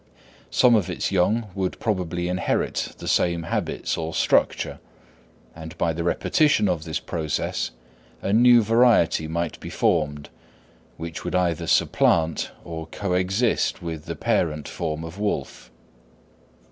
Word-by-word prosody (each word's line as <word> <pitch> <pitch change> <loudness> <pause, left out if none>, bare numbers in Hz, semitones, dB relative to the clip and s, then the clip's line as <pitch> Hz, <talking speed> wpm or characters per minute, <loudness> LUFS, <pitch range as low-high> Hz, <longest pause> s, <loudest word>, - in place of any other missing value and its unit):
Some 125 -1 +4
of 105 -6 +2
its - - -2
young 105 +4 +1
would 95 -1 -3
probably 90 -5 -1
inherit 90 0 -1
the - - -8
same 85 -1 +1
habits 85 - -2
or 80 0 -4
structure, - - +1 0.8
and 80 0 -9
by 85 -1 +1
the 85 +1 -3
repetition 140 - +2
of 80 -2 -1
this 80 -2 -2
process, 80 -3 -2 0.5
a 100 - -2
new 120 +1 +6
variety 115 -8 +3
might 85 0 -3
be - - -8
formed 75 -3 0 0.7
which 80 0 -6
would - - -3
either 85 -3 0
supplant 80 -1 +2
or 80 -1 -6
coexist 95 +6 0
with 80 -3 -5
the - - -5
parent 75 -3 0
form 80 -1 -4
of 80 +4 -8
wolf. 70 -11 -3
85 Hz, 135 wpm, -24 LUFS, 80-100 Hz, 0.8 s, new